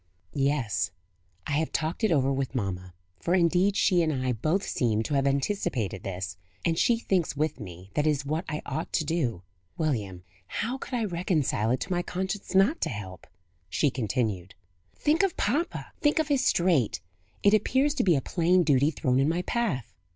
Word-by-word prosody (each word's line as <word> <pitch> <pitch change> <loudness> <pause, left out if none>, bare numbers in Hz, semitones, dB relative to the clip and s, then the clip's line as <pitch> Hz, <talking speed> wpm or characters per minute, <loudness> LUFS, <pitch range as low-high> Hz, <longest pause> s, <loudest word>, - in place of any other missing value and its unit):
"Yes. 130 -10 0 0.6
I - - -4
have 160 - -2
talked 160 +7 -2
it 220 - +3
over 135 -3 +3
with 135 0 -2
mamma 90 -5 -3 0.2
for 175 - +1
indeed 180 +3 +3
she 180 -3 +4
and 160 -1 +1
I 130 -3 -1
both 155 - 0
seem 110 -3 +1
to 145 - -3
have 140 -1 +2
anticipated 140 - -1
this 95 -1 -5 0.3
and 165 -1 +2
she 235 +7 +3
thinks 185 -9 0
with 155 -2 -1
me, 90 -2 -10
that 150 0 +1
it - - +5
is 145 -2 0
what 155 +4 -1
I 150 -1 -4
ought 155 +4 -4
to 160 - +1
do. 130 - -1 0.3
William, 105 - -2 0.2
how 245 - -3
could 255 - -5
I 230 -2 0
reconcile 170 - 0
it 125 - +1
to 185 - -4
my 175 -1 +1
conscience 190 +2 -4
not 205 - +4
to - - 0
help?" 95 -5 -7 0.4
she 140 - +1
continued. 110 -7 -2 0.4
"Think 310 +3 +2
of 390 -3 0
papa! 295 - -1
think 295 0 +3
of 315 -1 +1
his 275 -3 +2
strait! 170 - +2 0.4
It 200 - +5
appears 260 +7 +3
to - - 0
be 175 -4 +4
a 135 - +1
plain 180 +3 +2
duty 145 -2 +3
thrown 130 -4 0
in 140 +3 +3
my 175 +2 0
path." 215 - -1
155 Hz, 190 wpm, -27 LUFS, 120-185 Hz, 0.6 s, it